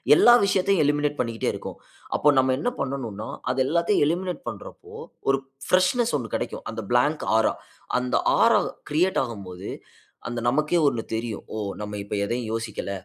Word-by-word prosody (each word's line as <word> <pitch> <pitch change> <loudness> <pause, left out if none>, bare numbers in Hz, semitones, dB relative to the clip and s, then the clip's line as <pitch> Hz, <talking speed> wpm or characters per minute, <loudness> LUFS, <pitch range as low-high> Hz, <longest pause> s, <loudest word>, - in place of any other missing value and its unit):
எல்லா 240 - +7
விஷயத்தையும் 195 -2 +2
எலிமினேட் 145 0 +1
பண்ணிக்கிட்டே 115 -1 -1
இருக்கும். - - -7 0.4
அப்ப 150 - +4
நம்ம 130 0 +4
என்ன 245 - 0
பண்ணனும்னா, 120 -6 -4 0.2
அது 130 +1 0
எல்லாத்தையும் 170 +3 +2
எலிமினேட் 180 +3 -1
பண்றப்போ, 110 -4 -8 0.4
ஒரு 135 0 +3 0.3
பிரஷ்னெஸ் 185 +6 +3
1 115 -5 -7
கிடைக்கும். - - -4
அந்த 110 -1 -5
பிளாங்க் 145 +6 +2
ஆரா, 110 - +3 0.5
அந்த 125 0 -1 0.2
ஆரா - - +6 0.3
கிரியேட் 180 +5 +2
ஆகும் 110 -6 -6
போது, 90 +1 -7 0.6
அந்த 120 -1 -3
நமக்கே 155 +6 +2
1 115 -5 0
தெரியும். 115 -1 -4
"ஓ! - - -3 0.3
நம்ம 105 0 -6
இப்ப 100 - -4
எதையும் 120 0 -3
யோசிக்கல." 110 -3 -4
130 Hz, 155 wpm, -25 LUFS, 115-165 Hz, 0.6 s, எல்லா